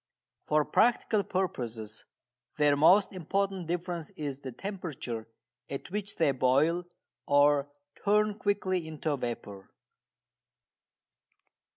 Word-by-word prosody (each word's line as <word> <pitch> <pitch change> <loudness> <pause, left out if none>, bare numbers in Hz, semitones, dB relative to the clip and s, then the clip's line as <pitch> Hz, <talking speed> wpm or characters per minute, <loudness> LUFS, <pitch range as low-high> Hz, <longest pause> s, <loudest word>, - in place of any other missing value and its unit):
For 150 -1 +2
practical 225 -2 +3
purposes 120 - -3 0.5
their 145 -1 +4
most 185 +8 +5
important 190 0 -1
difference 175 -2 -3
is 140 -3 -5
the 135 -2 -7
temperature 140 - -5 0.4
at 140 +5 -6
which 205 0 -3
they 160 -4 +3
boil, 140 +7 +2 0.4
or 145 0 +4 0.3
turn 210 0 +2
quickly 185 -4 0
into 155 -1 -2
vapour. 110 -6 -6
160 Hz, 95 wpm, -30 LUFS, 140-190 Hz, 0.5 s, most